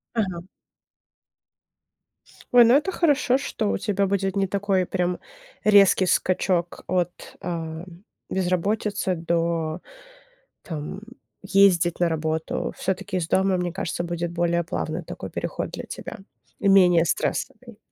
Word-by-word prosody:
Ага. 190 -6 -1 2.1
Ой, 245 -1 +9
ну 235 - +5
это 300 +7 +3
хорошо, 290 -7 +2
что 190 - -2
у 95 - 0
тебя 200 - 0
будет 195 0 -1
не 195 -1 +1
такой 195 -1 0
прям 180 -1 -1 0.4
резкий 200 -3 +5
скачок 180 -1 0
от, 180 -1 -2
ам, 165 -1 -5 0.4
безработицы 190 +2 0
до, 165 0 -1 0.8
там 160 +4 -6 0.4
ездить 190 -4 +3
на 170 - +3
работу. 160 0 -2
Всё-таки 190 0 -2
из 165 -2 -2
дома, 190 0 +2
мне 180 -1 -2
кажется, 175 -1 -3
будет 170 0 -3
более 170 0 0
плавный 170 - -4
такой - - -7
переход - - -4
для - - -6
тебя - - -8 0.4
и - - 0
менее 180 -4 +6
стрессовый. 240 - -3
180 Hz, 125 wpm, -24 LUFS, 170-200 Hz, 2.1 s, Ой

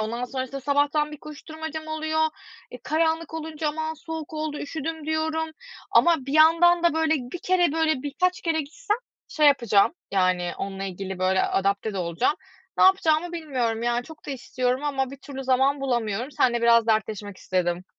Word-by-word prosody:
Ondan 230 +3 -2
sonrasında 260 +1 -5
sabahtan 290 +2 +1
bir - - -6
koşturmacam 315 +1 -7
oluyor. 315 0 -1 0.5
Eee, - - -9
karanlık 320 0 0
olunca 315 -1 -3
"Aman, 315 +1 -3
soğuk 320 0 -7
oldu, 305 -1 -3
üşüdüm," 315 +1 -5
diyorum 315 0 -1 0.4
ama 340 -1 +5
bir 275 - -4
yandan 335 +3 +5
da 340 -2 +3
böyle 320 0 +2
1 260 +3 -5
kere, 360 -4 +2
böyle 315 -4 +1
birkaç 355 +6 0
kere 325 -2 +1
gitsem 415 - -2 0.3
şey 305 -1 +2
yapacağım 235 -7 +4 0.2
yani, 185 -2 +1
onunla 195 0 -4
ilgili 190 0 -5
böyle 190 +1 +2
adapte 200 +2 0
de - - -2
olacağım. 170 - 0 0.4
Ne - - +6
yapacağımı 350 -3 +3
bilmiyorum 255 -9 -2
yani, 240 +1 0
çok 320 +2 -13
da - - -4
istiyorum 255 0 -2
ama 270 -3 -1
bir 275 - -9
türlü 270 0 -8
zaman 265 +2 +2
bulamıyorum. 240 -2 -1
Seninle 240 -3 +1
biraz 230 -1 +5
dertleşmek 215 -3 -1
istedim. 180 -1 -1
285 Hz, 165 wpm, -25 LUFS, 235-315 Hz, 0.5 s, Ne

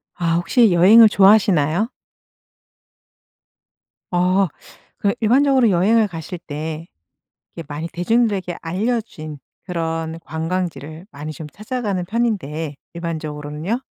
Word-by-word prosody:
아 165 -1 0
혹시 210 +5 +3
여행을 210 +6 +7
좋아하시나요? 195 -3 +4 2.2
어. 185 +2 +2 0.5
그 200 - +1
일반적으로 260 +1 +3
여행을 210 +5 +3
가실 170 -1 -7
때 155 +1 -6 0.7
이게 165 - -6
많이 150 +2 -5
대중들에게 190 0 0
알려진 180 -4 -3 0.3
그런 165 -2 -3
관광지를 160 0 -4
많이 150 +2 -7
좀 155 +2 -8
찾아가는 215 -4 -3
편인데 175 -9 -2 0.2
일반적으로는요. 155 +3 -4
175 Hz, 260 characters per minute, -20 LUFS, 160-215 Hz, 2.2 s, 여행을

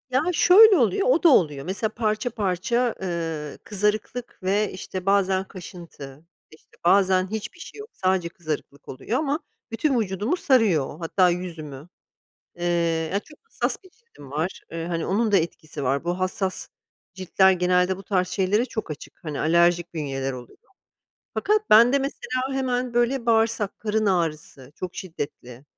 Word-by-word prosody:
Ya, 260 +1 +2
şöyle 400 +6 +7
oluyor, 390 - +2
o - - +3
da 340 - +8
oluyor 150 - +3
mesela 195 +5 -1
parça 215 +2 -1
parça, 215 +3 0
ııı, 165 -5 -4
kızarıklık 210 +4 -2
ve, 200 +3 +1
işte, 185 0 -6
bazen 195 -1 +2
kaşıntı, 170 -6 -11 0.3
işte, 155 - -21
bazen 190 0 +4
hiçbir 220 +8 -5
şey 335 - -10
yok 425 +2 -9
sadece 185 -2 0
kızarıklık 155 -4 -6
oluyor 225 - -3
ama 295 0 -1 0.3
bütün 255 +2 +1
vücudumu 210 - -1
sarıyor 220 - +3
o, 150 - -10
hatta 180 +2 +3
yüzümü. 165 -5 -5 0.7
Eee, 175 - -5 0.5
ya 200 - +1
çok 300 +7 -18
hassas 455 - -3
bir 375 - -17
cildim 445 - -17
var, 155 +6 -3
eee, 165 0 -4
hani, 170 -1 -2
onun 215 +3 +1
da - - +6
etkisi 155 -4 -3
var. 135 +3 0
Bu 175 +1 -2
hassas 185 0 -2 0.5
ciltler, 190 +1 +3
genelde 180 +1 +2
bu 195 - -10
tarz 185 -2 0
şeylere 205 +4 +1
çok 220 -8 -5
açık, 150 - -9
hani, 150 -3 -4
alerjik 170 +1 +2
bünyeler 135 -3 -3
oluyor, 125 -1 -11 0.8
fakat 425 +1 0
bende 235 +5 +7
mesela 270 -2 -3
hemen 255 -2 -1
böyle 240 +1 +1
bağırsak 225 -3 +1
karın 215 0 -1
ağrısı 155 -7 -2
çok 180 +1 -7
şiddetli. 140 -7 -7
190 Hz, 155 wpm, -24 LUFS, 165-230 Hz, 0.8 s, da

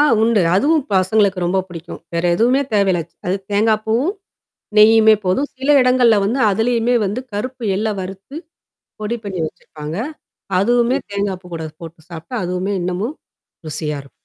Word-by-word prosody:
ஆ - - +7 0.2
உண்டு. 225 -4 +3
அதுவும் 300 +5 +2
பசங்களுக்கு 190 +1 +2
ரொம்ப 190 +2 +1
பிடிக்கும். 170 -1 -9
வேற 170 +1 -1
எதுவுமே 245 +8 +3
தேவையில்ல. 195 -4 +2
ச்சு - - -42
அது 190 - +1 0.2
தேங்காய் 215 +1 +2
பூவும், 255 - +1 0.6
நெய்யுமே 220 0 +7
போதும். 230 +11 +1
சில 265 +2 -3
இடங்கள்ல 250 -3 +4
வந்து 235 +7 0
அதலயுமே 230 +3 +1
வந்து 210 +6 -2
கருப்பு 245 +4 -4
எள்ள 215 +3 -1
வறுத்து, 195 +8 -8 0.7
பொடி 225 +3 -2
பண்ணி 195 -3 -5
வச்சிருப்பாங்க. 155 -1 -8 0.6
அதுவுமே 240 +5 +2
தேங்காய் 200 -2 -2
பூ - - -12
கூட 160 - -5 0.2
போட்டு 165 0 -10
சாப்புட்டா 170 +9 -8
அதுவுமே 180 +3 -2
இன்னமும், 185 - -2 0.5
ருசியா 150 -1 -3
இருக்கும். 140 - -19
205 Hz, 150 wpm, -19 LUFS, 180-240 Hz, 0.7 s, ஆ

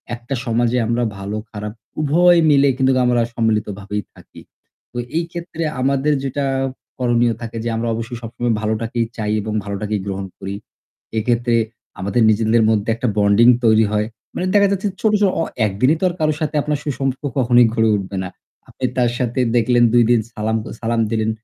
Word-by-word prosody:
একটা 120 +3 -5
সমাজে 120 +1 +1
আমরা 120 +1 0
ভালো 100 +2 -4
খারাপ 105 -1 -6 0.3
উভয় 175 +4 +4
মিলে 140 -1 +5
কিন্তু 130 0 +3
আমরা 120 -1 +3
সম্মিলিত 110 -2 +1
ভাবেই 105 +1 -4
থাকি। - - -15 0.5
তো 120 - -8 0.2
এই 170 - +1
ক্ষেত্রে 170 -1 -5 0.2
আমাদের 140 +3 +2
যেটা 140 +1 -2 0.5
করণীয় 120 -1 +2
থাকে 115 0 -6
যে 120 - -1
আমরা 115 +1 -2
অবশ্যই 115 +2 -5
সবসময় 120 +1 -2
ভালোটাকেই 115 +2 -1
চাই 105 -2 -2
এবং 110 +1 -4
ভালোটাকেই 105 +1 -3
গ্রহণ 100 -1 -4
করি। 95 +1 -5 0.6
এক্ষেত্রে 120 +1 +1 0.4
আমাদের 100 +5 0
নিজেদের 110 +1 +3
মধ্যে 110 0 +1
একটা 125 +2 -2
বন্ডিং 100 +3 +5 0.2
তৈরি 110 0 +5
হয়। 105 0 0 0.3
মানে 180 - -1
দেখা 200 -1 +5
যাচ্ছে 200 +1 -1
ছোট, 220 - +3
ছোট 200 - +5
অ - - +1 0.2
একদিনই 110 +9 +2
তো - - -5
আর - - -5
কারো 155 -1 +2
সাথে 155 0 -2
আপনার 150 0 -1
সুসম্পর্ক 135 -1 -2 0.2
কখনোই 120 -1 +5
ঘরে 115 -1 +2
উঠবে 100 -1 -4
না। 90 - -5 0.4
আপনি 130 - -4
তার 120 -1 +3
সাথে 125 0 -1 0.2
দেখলেন 120 +1 +3
২ 120 -1 +6
দিন 120 - +5
সালাম 110 +1 -1 0.2
সালাম 115 0 0
দিলেন। 110 -1 0
115 Hz, 175 wpm, -19 LUFS, 110-130 Hz, 0.6 s, ২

